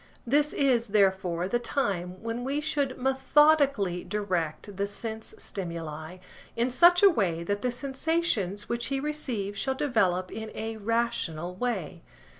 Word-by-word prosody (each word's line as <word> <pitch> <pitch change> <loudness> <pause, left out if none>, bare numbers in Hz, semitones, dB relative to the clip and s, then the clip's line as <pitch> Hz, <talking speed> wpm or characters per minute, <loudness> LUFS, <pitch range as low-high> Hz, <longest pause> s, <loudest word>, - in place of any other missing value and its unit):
This 290 +4 +2
is, 255 -5 +2
therefore, 190 -4 +2
the 240 +5 0
time 195 -8 -2
when 230 +1 -3
we 275 +3 -1
should 290 -4 -1
methodically 265 - +3
direct 185 -2 -3
the 200 +1 -1
sense 220 +2 -5
stimuli, 165 -2 -5 0.4
in 240 +2 +1
such 350 +7 +6
a 400 - +10
way 175 - 0
that 205 +3 -2
the 250 - 0
sensations 265 - -1
which 235 0 -2
he 275 0 -1
receives 250 -9 -3
shall 265 -1 -1
develop 190 -10 +1
in 220 0 -6
a 220 0 -4
rational 210 -7 -1
way. 185 -6 -3
220 Hz, 140 wpm, -28 LUFS, 185-265 Hz, 0.4 s, a